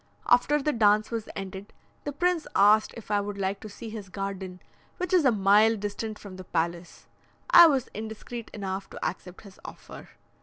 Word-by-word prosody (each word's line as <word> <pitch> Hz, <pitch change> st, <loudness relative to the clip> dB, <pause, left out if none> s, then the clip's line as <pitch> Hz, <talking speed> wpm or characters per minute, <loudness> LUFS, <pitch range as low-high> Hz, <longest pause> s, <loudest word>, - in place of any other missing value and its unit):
After 270 Hz, +5 st, +4 dB
the 300 Hz, +1 st, 0 dB
dance 215 Hz, -1 st, +3 dB
was 225 Hz, -2 st, -4 dB
ended, 195 Hz, +1 st, -7 dB, 0.3 s
the 290 Hz, -, -2 dB
prince 350 Hz, +3 st, 0 dB
asked 210 Hz, +2 st, +5 dB
if 220 Hz, -2 st, -9 dB
I 205 Hz, -1 st, +2 dB
would 205 Hz, 0 st, -5 dB
like 195 Hz, 0 st, -2 dB
to 215 Hz, -, -9 dB
see 220 Hz, +2 st, -9 dB
his 210 Hz, -3 st, -8 dB
garden, 190 Hz, -1 st, -5 dB, 0.4 s
which 365 Hz, 0 st, -3 dB
is 350 Hz, -5 st, +4 dB
a 260 Hz, -, +6 dB
mile 210 Hz, +2 st, +4 dB
distant 210 Hz, +1 st, -5 dB
from 195 Hz, -3 st, -11 dB
the 185 Hz, -, -8 dB
palace. 170 Hz, 0 st, -3 dB, 0.5 s
I 345 Hz, -1 st, +10 dB
was 270 Hz, -5 st, +1 dB
indiscreet 220 Hz, +2 st, -7 dB
enough 195 Hz, -1 st, -5 dB
to -, -, -6 dB
accept 180 Hz, +1 st, -8 dB
his 200 Hz, -3 st, -15 dB
offer. -, -, -11 dB
210 Hz, 185 wpm, -27 LUFS, 195-230 Hz, 0.5 s, I